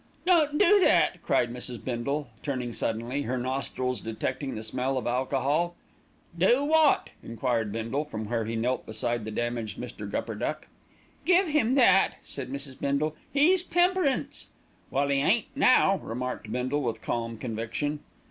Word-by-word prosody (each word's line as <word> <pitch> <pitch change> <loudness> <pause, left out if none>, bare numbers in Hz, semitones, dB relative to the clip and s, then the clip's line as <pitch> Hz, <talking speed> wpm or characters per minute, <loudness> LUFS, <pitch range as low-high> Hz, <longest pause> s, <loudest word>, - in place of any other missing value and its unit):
"Don't 315 -5 +4
do 410 +2 +6
that!" 370 - +3
cried 120 0 +1
Mrs. 125 -1 -5
Bindle, 140 +4 -2
turning 125 -4 -3
suddenly, 115 +6 -2
her 130 -1 -2
nostrils 130 -1 -2
detecting 115 +4 -3
the 110 - -5
smell 130 +4 -1
of 130 - -3
alcohol. 135 +7 0 0.6
"Do 235 +11 +3
what?" 315 -1 +3
enquired 115 -2 -1
Bindle 115 +7 -2
from 110 -7 -5
where 115 0 -1
he 115 +1 -3
knelt 125 +3 -1
beside 110 +1 -2
the - - -4
damaged 115 -2 -3
Mr. 115 -4 -7
Gupperduck. 115 +9 -3 0.6
"Give 365 0 +4
him 265 -5 +2
that," 235 -8 +5
said 135 -2 -7
Mrs. 140 -1 -6
Bindle, 145 +2 0 0.2
"he's 340 +6 +4
temperance." 355 -5 +1 0.4
"Well, 140 +1 0
'e 140 0 +2
ain't 210 +10 +2
now," 255 -8 +5
remarked 125 -2 -5
Bindle 130 +4 -1
with 115 -4 -3
calm 115 -1 -2
conviction. 120 +6 -3
130 Hz, 145 wpm, -27 LUFS, 115-175 Hz, 0.6 s, do